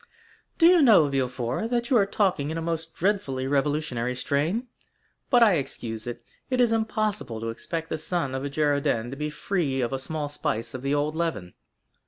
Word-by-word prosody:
"Do 330 - +5
you 350 -1 +7
know, 215 - +6
Villefort, 130 - -1
that 240 +2 -1
you 250 - +6
are 200 -3 +3
talking 185 -9 +1
in 160 - -3
a - - -1
most 165 0 -4
dreadfully 165 -9 0
revolutionary 135 -3 0
strain? 155 - 0 0.6
But 245 -2 +6
I 205 -6 +5
excuse 115 -5 -5
it, 120 - -6 0.3
it 255 -1 0
is 240 -2 +4
impossible 215 - -1
to 115 +1 -3
expect 160 +8 -4
the 160 - -2
son 160 -4 -2
of 130 0 -3
a 140 - -2
Girondin 140 -5 0
to - - -5
be 150 +2 -3
free 150 -3 -1
from 120 - -2
a 135 - -1
small 150 +2 -3
spice 115 -5 -3
of 130 - -5
the 140 +2 0
old 145 +1 0
leaven." 160 - -3
150 Hz, 195 wpm, -26 LUFS, 130-195 Hz, 0.6 s, you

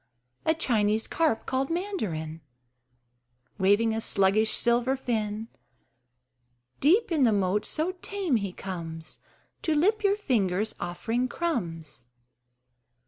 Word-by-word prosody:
A 320 - +4
Chinese 220 -7 +1
carp 315 -9 0
(called 265 +1 -1
Mandarin) 200 - -3 1.2
Waving 205 +4 +3
a 225 - -2
sluggish 200 +2 +3
silver 240 +4 +3
fin 220 -4 -2 1.3
Deep 370 - +3
in 310 -4 +3
the 235 - +5
moat: 200 0 +1
so 315 +4 0
tame 385 -10 0
he 200 -3 -3
comes 165 -4 -6 0.4
To 315 - 0
lip 420 +8 +2
your 400 0 +4
fingers 215 - 0
offering 225 +8 -2
crumbs. 165 - -4
225 Hz, 110 wpm, -27 LUFS, 195-310 Hz, 1.3 s, the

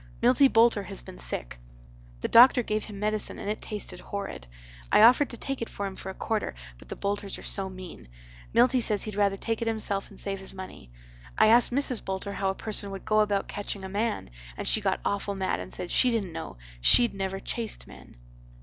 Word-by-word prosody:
Milty 255 +3 +5
Boulter 225 -3 +4
has - - -8
been - - -12
sick. - - -4 0.6
The - - -1
doctor 245 +1 +7
gave 215 -1 -2
him 205 -2 -9
medicine 215 0 -1
and - - -7
it 210 +1 -2
tasted 200 -4 -3
horrid. 200 - -6 0.4
I - - +6
offered 255 +5 +6
to 235 - -8
take 275 0 -4
it 230 - -3
for 200 - -5
him 195 -1 -5
for 190 - -8
a 190 - -7
quarter 220 - -2 0.2
but - - -16
the - - -5
Boulters 200 -1 -3
are - - -11
so 195 -1 -1
mean. 185 - -10 0.4
Milty 250 +2 +4
says 210 -3 +1
he'd 215 - -5
rather 200 -1 +1
take 225 +2 -3
it 230 - -1
himself 210 -3 -2
and 200 - -10
save 195 -1 -3
his 190 0 -6
money. 185 - -10 0.5
I - - +6
asked 235 +2 +5
Mrs. 255 -2 0
Boulter 190 +1 -4
how 195 -1 -1
a 190 - -2
person 210 -1 -5
would 195 -1 -8
go 215 0 +3
about 205 -2 +1
catching 205 -1 -5
a 190 - -6
man 210 - -2 0.3
and - - -4
she 220 - +3
got 195 -2 0
awful 200 0 -1
mad 190 -1 -1
and - - -7
said 175 - -5
she 255 - +4
dident 215 -7 -1
know, 160 - -7 0.2
shed 240 - +7
never 195 -1 -3
chased 225 +2 -4
men. - - -15
205 Hz, 220 wpm, -27 LUFS, 195-225 Hz, 0.6 s, doctor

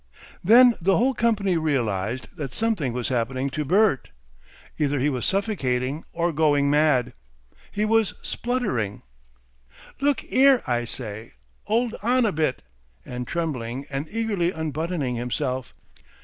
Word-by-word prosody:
Then 240 +6 +7
the 190 +3 +3
whole 260 +3 +2
company 205 -7 +1
realised 120 -7 -1
that 140 -5 -6
something 215 - 0
was 120 0 -3
happening 130 +2 -1
to 150 +2 -2
Bert; 190 -1 +2 0.7
either 145 -1 +1
he 140 +3 +1
was 125 -4 -2
suffocating 150 - -1
or 170 0 -1
going 145 -2 +3
mad. 145 -5 +3 0.6
He 210 +1 0
was 225 -1 +2
spluttering. 210 - -2 1.0
"Look 285 +1 +1
'ere! 270 -1 +5
I 120 -2 0
say! 110 -2 -7 0.3
'Old 230 +2 +1
on 245 +3 +2
a 210 - +2
bit!" 155 -6 -1 0.4
and 125 0 -6
trembling 135 -6 -3
and 140 +3 -3
eagerly 210 -6 0
unbuttoning 160 -4 -2
himself. 125 +1 -3
150 Hz, 130 wpm, -24 LUFS, 125-210 Hz, 1.0 s, Then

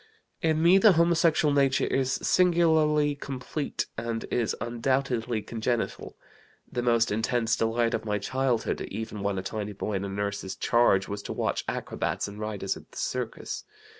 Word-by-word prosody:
"In 160 -1 +2
me 180 +3 +7
the 210 0 +7
homosexual 165 -2 +3
nature 135 -2 +3
is 135 0 0
singularly 160 -4 +3
complete, 140 +1 -4
and 115 -1 -3
is 115 -3 0
undoubtedly 120 -2 -1
congenital. 115 +1 -3 0.5
The 120 - -1
most 115 -2 +2
intense 115 +1 +1
delight 115 +1 +1
of - - -1
my 105 -1 -1
childhood 130 +2 -1
(even 110 0 -5
when 100 -1 -1
a 95 - -3
tiny 105 +1 -4
boy 105 +2 -4
in 95 0 -1
a 100 - -3
nurse's 100 -1 -3
charge) 115 -5 +3
was 100 0 -4
to - - -5
watch - - -1
acrobats - - -2
and 100 +1 -9
riders 105 -3 -2
at - - -14
the - - -13
circus. - - -3
120 Hz, 160 wpm, -27 LUFS, 105-145 Hz, 0.5 s, me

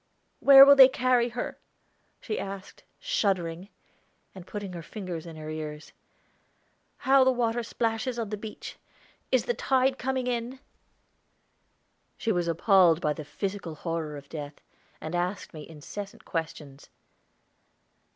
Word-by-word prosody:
"Where 275 -1 +10
will 280 0 +8
they 265 -2 +10
carry 250 -2 +1
her?" 240 +1 -5 0.6
she 215 - -4
asked, 195 -1 -8
shuddering, 190 - -1 0.6
and 185 -2 -12
putting 205 -3 -6
her 170 - -6
fingers 175 -2 -7
in 165 - -9
her 155 0 -8
ears. 155 -1 -7 1.0
"How 270 0 +4
the 260 - +4
water 240 -2 0
splashes 230 +1 -2
on 225 -3 -3
the - - -1
beach! 210 +1 -9 0.5
Is - - +2
the 485 - 0
tide 265 - +1
coming 260 -1 -2
in?" 245 +1 -3 1.6
She 230 - -1
was 175 -4 0
appalled 170 -1 +4
by 150 -3 0
the 155 - -8
physical 180 +2 -5
horror 160 -2 -4
of 140 0 -12
death, 145 -2 -8 0.4
and 155 - -7
asked 180 +2 -3
me 155 -1 -10
incessant 195 +6 -9
questions. 150 -4 -6
195 Hz, 135 wpm, -27 LUFS, 165-240 Hz, 1.6 s, Where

